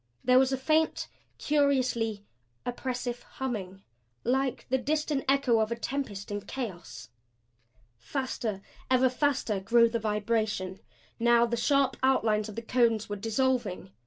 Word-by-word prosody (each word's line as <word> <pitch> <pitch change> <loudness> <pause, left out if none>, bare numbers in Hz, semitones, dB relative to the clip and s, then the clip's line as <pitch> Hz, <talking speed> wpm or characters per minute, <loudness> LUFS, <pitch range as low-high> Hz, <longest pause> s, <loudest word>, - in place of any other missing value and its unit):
There 255 +1 +6
was 265 0 +3
a 265 - +1
faint, 310 +4 +1 0.3
curiously 255 -8 +1 0.4
oppressive 245 -1 -3
humming 195 -7 -5 0.4
like 265 +1 0
the 260 +1 +2
distant 295 +1 -1
echo 275 -4 +3
of 220 +1 0
a - - 0
tempest 230 -6 -4
in 205 0 -3
chaos. 205 -5 -7 0.9
Faster, 220 - -3 0.3
ever 260 0 +4
faster 255 -6 0
grew 230 +4 +4
the 230 0 -1
vibration. 210 -3 -1 0.4
Now 235 0 +5
the 235 0 -1
sharp 275 +2 +2
outlines 220 -5 +2
of 210 - -9
the 230 - -5
cones 230 -3 +2
were 205 - -2
dissolving. 225 - -1
235 Hz, 130 wpm, -29 LUFS, 215-265 Hz, 0.9 s, There